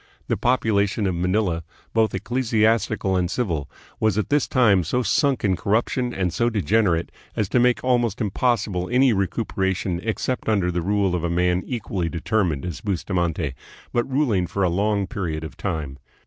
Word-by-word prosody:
The - - +2
population 110 -4 +1
of 95 - +1
Manila, 90 -1 0 0.3
both 110 -3 +2
ecclesiastical 110 -2 +1
and 90 -1 +1
civil, 85 - -2 0.3
was 110 -2 +2
at 105 - -1
this 145 0 +2
time 105 -8 +4
so 125 +10 0
sunk 140 0 +1
in 95 -3 +2
cor 100 - -2
ruption 120 +2 +1
and 90 -5 -1
so 120 +6 +2
degenerate 100 -4 +1 0.2
as 105 - 0
to 125 - +3
make 125 0 +3
almost 120 -4 +1
impossible 105 -4 0
any 125 0 +4
recuperation 95 -3 -1
except 115 +3 -2
under 95 -5 +2
the 90 0 -1
rule 100 +1 +1
of 90 -2 -1
a 85 - 0
man 90 +1 +1
equally 100 -8 -2
determined 85 -3 -1
as 85 -5 -5
Bustamante, 85 -6 -1 0.4
but 120 +3 0
ruling 120 -10 +1
for 100 - -2
a 90 - +3
long 100 +3 +1
period 85 -8 -4
of 80 - -7
time. 75 -8 -4
100 Hz, 170 wpm, -23 LUFS, 90-115 Hz, 0.4 s, time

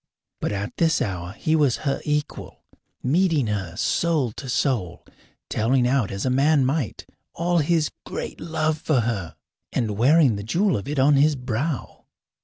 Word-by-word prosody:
But - - -2
at 100 0 -4
this 165 -1 +2
hour 90 - -3
he 155 +7 0
was 145 -6 +3
her 140 - 0
equal, 150 -1 -3 0.4
meeting 160 0 +2
her 100 -5 -3
soul 155 -5 +1
to 130 +4 -8
soul, 120 - -1 0.4
telling 120 +3 +1
out 125 -5 +1
as 100 +3 -4
a 130 - +1
man 140 +1 +3
might 135 - -2 0.3
all 175 +1 +1
his 155 0 +1
great - - -6
love 155 -1 -1
for 150 -5 +1
her, 100 -8 -3 0.4
and 105 -3 -2
wearing 135 -2 +5
the 100 - -5
jewel 180 - +1
of 100 - -4
it 145 +1 -3
on 140 +2 +4
his 150 +2 +4
brow. 130 +3 -4
135 Hz, 165 wpm, -23 LUFS, 110-155 Hz, 0.4 s, wearing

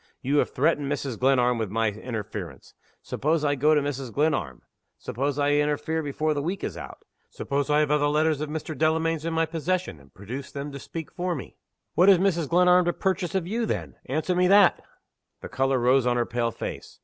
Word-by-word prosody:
You 140 +3 +1
have - - +2
threatened 145 0 0
Mrs. 135 -4 -3
Glenarm 125 -2 +3
with 110 -3 -2
my 115 +2 +1
interference. 105 - -7 0.3
Suppose 155 +2 -1
I 145 - +2
go 150 +3 +3
to 150 - +3
Mrs. 135 -3 -4
Glenarm? 110 - -1 0.3
Suppose 135 +3 -3
I 145 0 +2
interfere 150 +2 0
before 155 +1 -1
the 145 - -2
week 180 +6 -3
is - - -3
out? - - -10 0.2
Suppose 140 +1 -2
I 150 +1 +4
have 150 -1 0
other 150 -1 +3
letters 150 0 +1
of 155 - -3
Mr. 155 0 -5
Delamayn's 160 +1 0
in 165 - -2
my 165 0 +2
possession, 165 - -2
and 70 -1 -20
produce 120 - -8
them 140 +1 -5
to 140 - -7
speak 160 +3 -7
for 180 0 -2
me? 135 - -8 0.4
What 180 +3 +5
has 195 - +7
Mrs. 175 -5 0
Glenarm 180 +1 +5
to 175 - +1
purchase 190 -1 -1
of 190 -3 0
you 225 +5 -2
then? - - -3
Answer 155 +6 -1
me 180 0 +3
that!" 200 -1 +5 0.6
The - - -8
color 135 +1 +1
rose 125 +1 +3
on 120 0 +2
her 120 - +1
pale 120 0 -1
face. - - -7
145 Hz, 210 wpm, -25 LUFS, 130-165 Hz, 0.6 s, has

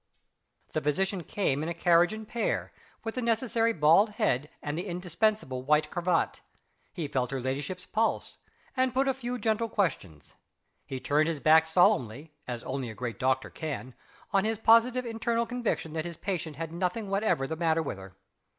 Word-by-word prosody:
The - - 0
physician 190 +6 0
came 150 -6 -1
in 160 - -2
a 170 - -3
carriage 170 +1 +4
and 215 0 -7
pair, 235 0 -2 0.3
with 225 -1 -3
the 255 - -3
necessary 230 0 +1
bald 170 +4 +5
head, 150 - 0
and 145 0 -3
the 175 +5 -4
indispensable 180 -5 -1
white 150 +3 +2
cravat. 175 -1 0 0.5
He 165 -5 -4
felt 130 -3 -1
her 135 - -3
ladyship's 140 +8 -4
pulse, 225 +2 -1 0.4
and 255 -1 +1
put 270 +1 +2
a 270 - +3
few 250 -1 -4
gentle 225 0 0
questions. 95 - -2 0.5
He 130 - -4
turned 150 +4 +2
his 160 -3 -2
back 160 +2 +5
solemnly, 150 -4 +2
as 120 -2 -5
only 130 -2 -3
a 110 - -8
great 120 0 -5
doctor 130 0 +1
can, 145 -5 -5 0.4
on 195 -1 +4
his 220 0 0
own 225 - -25
positive 240 +3 +5
internal 230 0 -1
conviction 230 -9 -2
that 160 0 -2
his 170 -2 -6
patient 170 -6 -3
had 165 +1 -5
nothing 180 +5 -2
whatever 195 -8 +1
the 160 - -3
matter 165 -1 +1
with 100 - -5
her. 95 0 -12
170 Hz, 180 wpm, -29 LUFS, 145-220 Hz, 0.5 s, bald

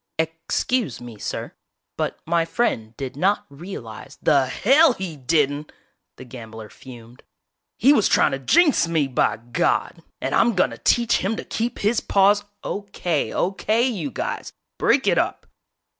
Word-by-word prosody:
"Ex 165 0 -2
cuse 235 - -1
me, 120 -3 -11
sir, - - -5 0.4
but - - -2
my 170 0 +2
friend 120 - -2
did 135 -2 -5
not 200 +6 +1
real 155 - -8
ize 110 +5 -11
" - - -48
"The 140 -4 +3
hell 275 - +4
he 185 -7 -6
didn't!" 145 +2 0 0.4
The 130 - -11
gambler 115 -3 -10
fumed. 120 -2 -13 0.6
"He 270 +6 +5
was 220 -8 +3
trying - - +3
to 135 - -3
jinx 300 - +3
me, 160 -3 +1
by 130 - +1
God! 120 +2 -1 0.2
And - - -3
I'm 235 -2 +3
gonna 185 - +1
teach 235 -1 +2
him 195 +4 -1
to - - -6
keep 230 +1 -3
his 215 +3 +1
paws 205 +1 +3
" - - -52
"Okay, 195 -6 -2
okay, 215 +5 0
you 185 - -3
guys, 120 - -5 0.3
break - - +3
it - - +3
up!!" - - -2
165 Hz, 165 wpm, -22 LUFS, 130-210 Hz, 0.6 s, He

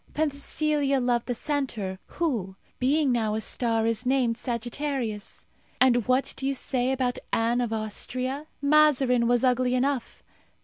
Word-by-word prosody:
Penthesilea 290 -1 0
loved 245 -1 0
the 245 - -1
centaur, 230 -9 -2 0.2
who, 225 - -1 0.2
being 280 +2 +2
now 220 -3 0
a 220 - -2
star, 225 -1 0
is 230 +1 +1
named 250 -2 +2
Sagittarius. 240 -2 -3 0.3
And 245 -3 +4
what 255 +2 +1
do 270 - -2
you 275 - 0
say 255 0 0
about 255 -2 -1
Anne 235 +2 +1
of 240 -2 -2
Austria? 255 +6 -3 0.2
Mazarin 280 -5 +4
was 245 0 +2
ugly 250 0 +2
enough! 260 -1 -1
250 Hz, 140 wpm, -26 LUFS, 235-275 Hz, 0.3 s, And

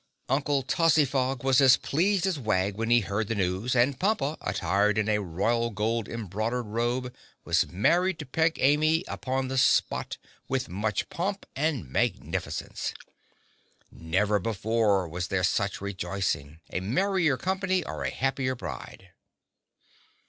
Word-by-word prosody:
Uncle 140 +1 +1
Tozzyfog 135 -3 +2
was 135 0 +4
as 130 -1 +7
pleased 190 +5 +1
as 185 -6 0
Wag 100 -4 0
when 115 +2 -2
he 120 0 +5
heard 100 +2 -2
the 115 - -1
news, 95 +6 -1
and 125 +2 +2
Pompa, 185 -7 +1
attired 100 +3 +1
in 110 0 +1
a 105 -1 +1
royal 115 +7 0
gold 110 +1 -1
embroidered 115 +3 -3
robe, 120 +3 -2 0.3
was - - +1
married 175 - +2
to 155 - -7
Peg 160 +5 +1
Amy 155 +4 +3
upon 130 0 -2
the 130 0 0
spot, - - +2 0.3
with 130 -1 -1
much 105 +2 -2
pomp 195 +3 -3
and 140 - -1
magnificence. 65 - -2 1.0
Never 100 +6 0
before 105 -1 +1
was 90 +3 -4
there 95 0 -1
such 100 +3 0
rejoicing—a 95 -5 -3
merrier 165 - +1
company 190 +1 0
or - - -5
a - - 0
happier 135 -1 -1
bride. 65 - -8
120 Hz, 135 wpm, -27 LUFS, 100-140 Hz, 1.0 s, as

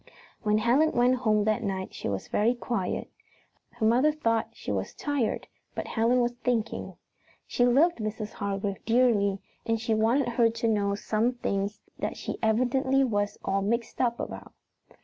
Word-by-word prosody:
When 210 -1 +2
Helen 255 +8 +3
went 250 +1 +3
home 215 -4 +2
that 215 +2 +1
night 190 -3 -3
she - - -4
was 100 -1 -3
very 230 +4 +2
quiet. 235 -6 -2 0.7
Her 240 -2 -2
mother 250 +7 +4
thought 230 -7 0
she - - -5
was - - -3
tired, 285 -7 -1 0.3
but - - -3
Helen 240 +2 +2
was 240 0 +1
thinking. 230 -3 -1 0.5
She 245 - +2
loved 300 +8 +4
Mrs. 215 0 -4
Hargrave 200 -1 -3
dearly, 225 -4 +3 0.3
and 225 0 0
she 225 0 0
wanted 230 +5 +2
her 235 -1 +3
to 230 0 -2
know 200 -2 +1
some 220 +4 0
things 200 -4 -2 0.2
that - - -3
she - - -5
evidently 255 +4 +2
was 205 -5 0
all 195 0 +1
mixed 230 +4 -1
up 240 -2 +1
about. - - -7
230 Hz, 165 wpm, -28 LUFS, 210-245 Hz, 0.7 s, mother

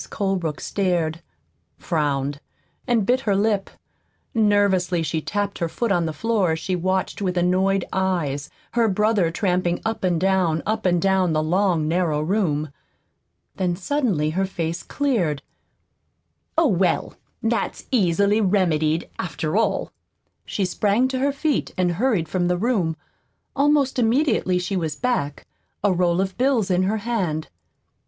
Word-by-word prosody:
Colebrook 190 -7 -2
stared, 175 -4 -1 0.6
frowned, 145 -2 -1 0.5
and 235 -5 +2
bit 250 +4 +3
her 210 -6 0
lip. 200 -1 +1 0.6
Nervously 200 -5 +2
she 160 0 -2
tapped 205 +3 -2
her 170 - -1
foot 235 +5 -2
on 175 -3 +2
the - - -2
floor 205 -2 +1
as - - -2
she 185 +2 -2
watched 185 +3 -1
with 180 -2 -1
annoyed 185 +2 +2
eyes 170 -7 -1 0.2
her 235 -1 +2
brother 210 -3 +2
tramping 180 -1 0
up 225 -2 -2
and 175 -3 +2
down, 185 -4 +1
up 215 -2 0
and 175 -1 +3
down, 190 -2 +2
the 155 0 +1
long, 175 -1 +1
narrow 165 -2 +1
room. 155 -4 0 0.9
Then 180 -2 0
suddenly 195 - 0
her 190 +4 0
face 170 -2 -3
cleared. 190 - -1 1.1
"Oh, 330 - +5
well, 180 -3 +1 0.3
that's 225 +1 -1
easily 200 -1 +3
remedied, 170 -5 +1
after 160 -2 -3
all." 210 -3 +1 0.6
She 200 - -1
sprang 210 +7 +1
to 260 -1 -2
her 280 +2 +2
feet 285 +1 -1
and 180 -1 +2
hurried 195 -3 +1
from 175 +2 0
the 180 0 +1
room. 190 -7 0 0.6
Almost 280 -2 +2
immediately 230 -6 +2
she 180 +2 -2
was 160 -5 -2
back 240 - -2 0.4
a 205 -2 +3
roll 175 0 +1
of 190 +2 -4
bills 250 -7 +2
in 180 0 +3
her 215 +3 0
hand. 180 -10 -1
185 Hz, 145 wpm, -23 LUFS, 170-215 Hz, 1.1 s, Oh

